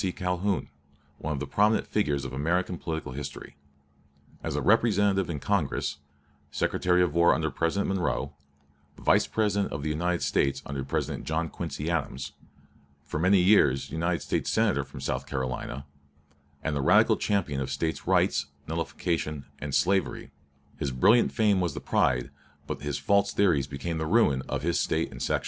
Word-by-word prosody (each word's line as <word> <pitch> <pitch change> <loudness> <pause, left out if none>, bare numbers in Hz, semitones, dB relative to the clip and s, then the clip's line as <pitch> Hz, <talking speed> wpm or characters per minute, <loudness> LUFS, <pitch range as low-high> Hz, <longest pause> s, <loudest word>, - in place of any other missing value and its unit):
Calhoun, 90 +1 -1 0.5
one 80 - -3
of 70 - -3
the 75 - -3
prominent 105 +9 +2
figures 75 -10 0
of 65 - -6
American 85 +6 0
political 80 -5 -4
history. 70 +2 -7 0.9
As - - -2
representative 100 -4 +3
in 75 -4 -3
Congress, 70 -5 -1 0.5
Secretary 90 0 +1
of 90 - 0
War 85 +1 +5
under 80 -1 -1
President 85 +5 0
Monroe, 90 -7 -1 0.6
Vice - - +3
President 100 -2 0
of 70 0 -4
the 80 - -1
United 85 +3 -1
States 70 0 +1
under 70 -1 -4
President 65 - -3
John 80 +2 -1
Quincy 80 -1 -4
Adams, 65 -5 -3 0.7
for 75 - -4
many 95 +4 +4
years 90 -8 +4
United 85 +2 -1
States - - -1
Senator - - +2
from - - -10
South 70 0 -3
Carolina, 65 0 -4 0.8
and 80 - -1
the 70 - 0
radical - - +5
champion 85 -10 -1
of 65 - -3
States 80 +4 -3
Rights, - - +2 0.2
Nullification, 80 -2 -2
and 70 -2 -3
Slavery, 95 +1 +1 0.5
his 70 - -1
brilliant 105 - +4
fame 105 -4 +2
was 85 -5 -1
the - - -3
pride, 65 -1 +1 0.3
but - - -5
his 75 -1 -2
false 100 +8 +2
theories 85 -9 +2
became 80 +4 -4
the 80 - -2
ruin, 80 - +3
of - - -2
his 85 +1 +1
State - - 0
and - - -9
section. - - +1
80 Hz, 160 wpm, -27 LUFS, 70-95 Hz, 0.9 s, War